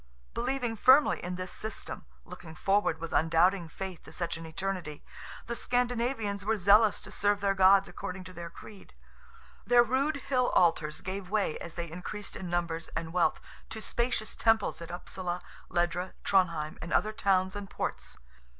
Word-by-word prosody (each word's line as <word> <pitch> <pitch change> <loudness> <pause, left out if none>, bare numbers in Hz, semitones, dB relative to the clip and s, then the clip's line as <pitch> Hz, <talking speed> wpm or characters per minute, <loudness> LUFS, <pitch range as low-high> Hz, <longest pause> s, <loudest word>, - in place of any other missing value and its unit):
Believing 250 - -1
firmly 260 +7 +5
in 180 +1 -3
this 185 0 -5
system—looking 180 -5 -7
forward 195 -2 +2
with 165 0 -6
undoubting 165 +2 +3
faith 190 +1 -6
to - - -13
such 170 +1 -3
an 165 0 -8
eternity—the 185 +5 -6
Scandinavians 240 -4 -1
were 220 +2 +1
zealous 205 +2 +5
to - - -10
serve 205 0 +1
their 200 -1 +2
gods 195 +1 +6
according 185 0 -6
to 185 0 -11
their 170 -1 -7
creed. 200 +4 -13 0.7
Their 240 0 +6
rude 270 +6 +1
hill 255 -3 0
altars 165 -3 +2
gave 190 0 -5
way 205 -6 +1
as 170 - -8
they 170 -2 -5
increased 195 +4 -7
in 180 - -6
numbers 170 -1 -2
and 165 0 -3
wealth, 180 -1 +2 0.3
to 220 - -5
spacious 235 0 -1
temples 225 -6 +2
at 170 - -7
Upsala, 175 0 -4 0.3
Ledra, 175 +1 -1
Tronheim, 170 -5 +1
and 165 - -6
other 215 - +2
towns 190 -2 +1
and 205 -1 -6
ports. - - -4
190 Hz, 160 wpm, -30 LUFS, 170-215 Hz, 0.7 s, gods